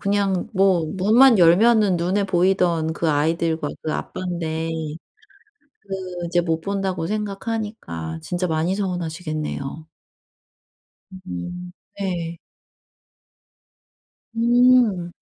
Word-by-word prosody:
그냥 200 -2 0
뭐 190 -4 +3
문만 225 +5 +6
열면은 195 +3 +5
눈에 185 +4 0
보이던 180 -3 +1
그 165 0 -1
아이들과 160 +1 0
그 155 - -2
아빤데 165 -3 -3 1.1
그 185 -3 -6
이제 175 +1 +2
못 165 -1 -1
본다고 190 -3 -2
생각하니까 210 - -4
진짜 180 +1 -2
많이 165 +3 0
서운하시겠네요. 160 -5 -4 1.4
음. 175 - -6 0.3
예. 170 -3 -3 2.0
음. 235 -6 +3
180 Hz, 190 characters per minute, -22 LUFS, 165-200 Hz, 2.0 s, 문만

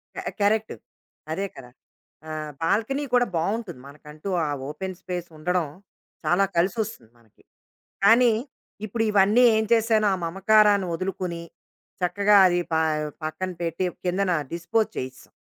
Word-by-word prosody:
క - - -13 0.2
కరెక్టు. 215 +2 +1 0.6
అదే 195 +5 -1
కదా. 125 -2 -11 0.6
ఆహ్, 155 -1 -5
బాల్కనీ 230 - 0
కూడా 245 0 +5
బావుంటుంది. 190 - -2
మనకంటూ 150 +5 -9 0.2
ఆ - - -1 0.2
ఓపెన్ 185 +5 -5
స్పేస్ 175 -1 -5
ఉండడం, 180 +1 0 0.6
చాలా 180 +5 +3
కలిసొస్తుంది 185 - -1
మనకి. 110 -3 -27 0.6
కానీ 230 +2 +6 0.5
ఇప్పుడు 225 +2 -2
ఇవన్నీ 205 +4 +4
ఏం 220 - +2
చేశాను? 220 -2 +3
ఆ - - +2
మమకారాన్ని 200 +2 +4
వదులుకొని, 180 -2 -4 0.6
చక్కగా 205 +3 +3
అది 175 -1 +2
ప - - +3 0.5
పక్కన 185 +4 -3
పెట్టి 170 +2 -2 0.2
కిందన 185 +1 +1 0.2
డిస్పోజ్ 170 +6 0
చేసేసాం. 130 0 -7
190 Hz, 125 wpm, -25 LUFS, 165-215 Hz, 0.6 s, కానీ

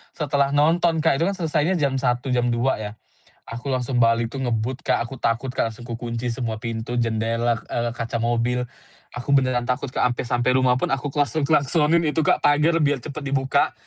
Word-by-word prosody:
Setelah 140 -2 0
nonton, 165 +2 +3
Kak, 135 - +3
itu 165 - +2
kan 200 - -1
selesainya 165 0 0
jam 140 -2 +1
01:00, 125 0 0
jam 125 -1 +1
02:00, 120 +1 0
ya. 105 -1 -5 0.6
Aku 120 +4 -6
langsung 125 0 -1
balik 115 0 +3
tuh 135 -1 -4
ngebut, 120 +2 -2
Kak, 115 - +1
aku 135 - -8
takut, 115 +3 0
Kak, 115 -3 -1
langsung 120 +2 -12
ku 115 - -4
kunci 120 0 -4
semua 115 -2 -3
pintu, 115 +1 -4
jendela, 115 +1 0
eee, 120 0 -1
kaca 115 0 -3
mobil, 120 +1 0 0.5
aku 120 +2 -8
beneran 130 -2 +1
takut, 125 +2 -1
Kak, - - 0
ampe 120 - -4
sampai 125 +1 +1
rumah 125 -1 +3
pun - - 0
aku 135 +1 -1
klakson-klasonin 150 +3 +2
itu, 155 +1 +1
Kak, - - +3
pagar 150 +3 +4
biar 145 -3 +1
cepet 155 0 -6
dibuka, 135 0 +1
125 Hz, 195 wpm, -23 LUFS, 120-145 Hz, 0.6 s, pagar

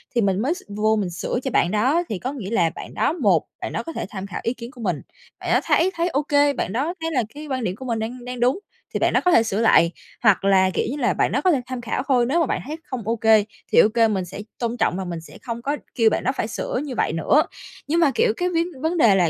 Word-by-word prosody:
thì 235 - +3
mình 195 -1 +1
mới 285 +7 +1
s 380 - -9
vô 215 +2 +1
mình 200 -4 -1
sửa 175 +7 -3
cho 265 - -2
bạn 175 - +2
đó. 265 +11 +2
Thì 200 -4 -3
có 260 +3 -4
nghĩa 215 -9 -6
là 175 -8 +2
bạn - - -8
đó, - - +1
một 255 - +2 0.2
bạn - - -4
đó - - -2
có 330 - -7
thể - - -3
tham 195 -3 -6
khảo 185 - -5
ý 230 - 0
kiến 235 +1 -9
của 245 - -12
mình, 180 -9 -1 0.4
bạn - - -5
đó - - +5
thấy 370 +3 +3
thấy 340 +1 0
OK, 285 -1 +2
bạn 190 - -2
đó 290 +9 -1
thấy 325 - -2
là 255 -6 +1
cái 300 +1 -8
quan 260 -4 -2
điểm 185 -2 -2
của 260 +5 -9
mình 230 -2 -1
đang 240 +3 -5
đang 250 0 -6
đúng, 255 +9 +2 0.3
thì - - 0
bạn - - +2
đó - - +3
có 360 - +5
thể 230 - +6
sửa 220 -1 -1
lại. 170 -6 +5 0.3
Hoặc 205 -3 +4
là, 190 -1 +4
kiểu - - 0
như 290 - -4
là, - - +1
bạn - - +1
đó - - +1
có 370 - +4
thể 275 - +1
tham 255 -1 -5
khảo 235 +2 -2
thôi, 250 -3 +3
nếu 285 +8 +1
mà 330 - +3
bạn - - -2
thấy 310 +2 -4
không 235 -4 -6
OK, 230 -1 -2 0.5
thì - - +6
OK 225 +1 +4
mình 190 -3 -1
sẽ 195 +3 -8 0.2
tôn 235 0 -2
trọng 190 - +1
và 190 - -3
mình 170 -2 -5
sẽ 165 - -13
không 235 -1 -5
có 285 +4 -1 0.2
kêu 225 -3 +5
bạn - - -1
đó 260 - +2
phải 215 - -1
sửa 240 - -3
như 270 -4 -5
vậy 160 - 0
nữa. 270 - +3 0.5
Nhưng 330 +3 +2
mà, 320 -5 +4
kiểu, 460 -1 +3
cái 360 0 0
vấn 335 -1 +1
vấn 330 +2 0
đề 225 -9 +5
là, 175 -4 +3
240 Hz, 300 wpm, -22 LUFS, 205-290 Hz, 0.5 s, thể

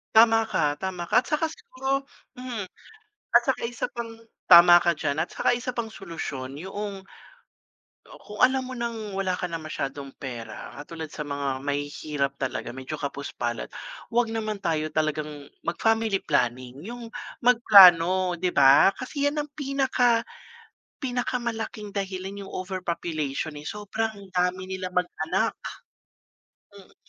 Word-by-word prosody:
Tama 225 0 +6
ka, 150 -6 +1
tama 190 -2 -3
ka. - - +6
At 255 - -6
saka 300 +1 +1
siguro 275 - -3 0.3
hmm, 250 -4 -4 0.7
at 240 - +9
saka 265 - +1
isa 240 0 -3
pang 235 -1 -5 0.4
tama 175 0 +10
ka 175 - +4
diyan, 145 -1 -2
at - - -9
saka 245 - +2
isa 250 +1 -3
pang 235 -2 -2
solusyon 140 -9 -6
yoong 195 +2 -5 1.1
o, - - -12
kung 210 - -9
alam 260 +1 +5
mo 255 - -7
ng 230 -4 -4
wala 190 -2 0
ka - - -3
na 165 - -3
masyadong 140 -3 -5
pera, 120 -4 -7
katulad 160 +1 -7
sa 150 - -4
mga 140 -2 -2
mahihirap 145 0 -2
talaga, 130 -3 -3
medyo 130 +3 -6
kapos 140 0 -4
palad. 120 -1 -3 0.4
'Wag 240 0 +2
naman 215 -1 -2
tayo 155 -2 0
talagang 155 -1 -1 0.4
mag-family 225 +4 +1
planning, 125 +2 -1
'yong 235 +1 -8 0.3
magplano, 185 -6 +7
'di 185 - +1
ba? 140 +6 +7
Kasi 285 +2 -1
'yan 295 0 -2
ang 295 - -15
pinaka 265 -5 +2 0.8
pinakamalaking 235 -4 -3
dahilan 195 0 -4
'yong - - -11
overpopulation, 170 -5 -3
eh, 150 - -12
sobrang 210 -1 -4
dami 180 0 0
nilang 185 -1 -4
mag-anak. 175 -3 0 1.2
Hmm. 200 -2 -16
190 Hz, 140 wpm, -26 LUFS, 155-230 Hz, 1.2 s, tama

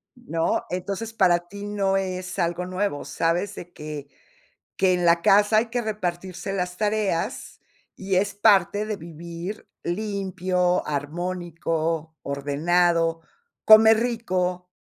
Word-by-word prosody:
¿No? 165 -10 -1
Entonces, 195 +5 -4
para 185 -5 +4
ti 200 +2 -8
no 200 -2 0
es 185 0 -4
algo 175 +1 0
nuevo, 185 -4 -2
sabes 175 +5 -1
de 175 - -9
que 150 -2 -7 0.7
que 185 -1 +3
en 180 -1 0
la 170 0 +4
casa 205 +4 +5
hay 220 - +3
que 245 +1 -2
repartirse 190 -3 -4
las 180 -2 -3
tareas, 210 -1 -1 0.4
y 195 -1 -2
es 200 +2 +1
parte 205 -1 +4
de 215 0 -2
vivir 170 +4 -8 0.2
limpio, 185 -2 -1
armónico, 165 +1 -3
ordenado, 165 +4 +1 0.5
comer 220 0 +8
rico. 185 -7 -1
180 Hz, 120 wpm, -24 LUFS, 170-205 Hz, 0.7 s, comer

